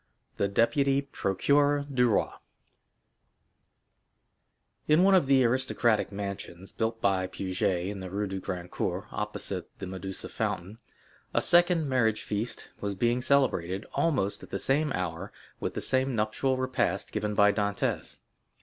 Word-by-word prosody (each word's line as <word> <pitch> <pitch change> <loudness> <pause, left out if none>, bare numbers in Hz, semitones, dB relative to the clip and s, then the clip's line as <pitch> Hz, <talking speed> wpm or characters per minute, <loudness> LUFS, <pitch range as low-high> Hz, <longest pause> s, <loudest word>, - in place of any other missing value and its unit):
The 100 - +1
Deputy 135 +7 +2
Procureur 140 +5 +1
du 125 -2 +3
Roi 105 - +1 2.6
In 155 +4 +5
one 195 +1 +5
of 180 -7 +4
the 135 -1 +5
aristocratic 120 -3 +1
mansions 100 -2 -6
built 115 0 -2
by 95 -3 +1
Puget 95 -1 -2
in 100 +1 -4
the 95 -1 -6
Rue 100 +3 -2
du 95 -1 -4
Grand 90 -2 -6
Cours - - -2
opposite - - -4
the - - -6
Medusa 95 +1 -6
fountain, 95 +6 -4 0.6
a - - +5
second 175 -2 +5
marriage 115 -5 +1
feast 105 +4 -4
was 100 -1 -3
being 120 +4 +1
celebrated, 110 -9 +1
almost 130 -12 0
at - - -12
the 95 - -3
same 145 +8 +1
hour 90 +2 -4 0.3
with - - -4
the 130 0 +4
nuptial 125 +2 0
repast 130 0 -1
given 105 0 -2
by 105 0 +5
Dantès. 100 -1 -2
110 Hz, 140 wpm, -28 LUFS, 95-135 Hz, 2.6 s, In